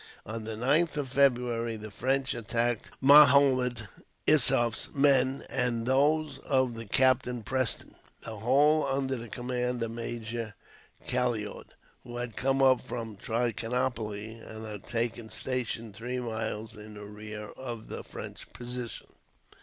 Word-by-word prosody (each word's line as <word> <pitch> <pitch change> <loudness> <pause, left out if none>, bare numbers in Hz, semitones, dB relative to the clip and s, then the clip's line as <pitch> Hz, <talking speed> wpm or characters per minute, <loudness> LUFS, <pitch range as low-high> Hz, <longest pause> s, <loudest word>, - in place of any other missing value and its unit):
On 110 0 -5
the 110 0 -4
9th 145 +8 +2
of 140 -3 -2
February, 120 -4 +2
the 110 0 -8
French 135 +5 0
attacked 115 0 -1
Mahomed 135 -5 +6 0.4
Issoof's 130 -6 +3
men 135 -1 +3
and 120 -2 0
those 145 +2 +2
of 130 -4 +1 0.2
Captain 130 -2 +3
Preston; 130 0 -1 0.3
the 110 -1 -5
whole 145 +7 +4
under 135 -1 0
the 120 -2 -7
command 125 0 -2
of 115 - -3
Major 115 -1 -5 0.5
Calliaud, 120 -4 -1 0.4
who 120 -1 -8
had 120 -2 -4
come 135 +1 +1
up 130 -2 +5
from 115 -3 -6
Trichinopoli, 115 -1 -2
and 110 0 -9
had 105 -2 -8
taken 115 -1 -2
station 115 -4 -3
three 120 +4 -4
miles 110 -1 -4
in 105 0 -11
rear 105 +1 -8
of 120 -4 -7
the - - -6
French - - -9
position. 120 -1 -5
120 Hz, 130 wpm, -29 LUFS, 110-130 Hz, 0.5 s, Mahomed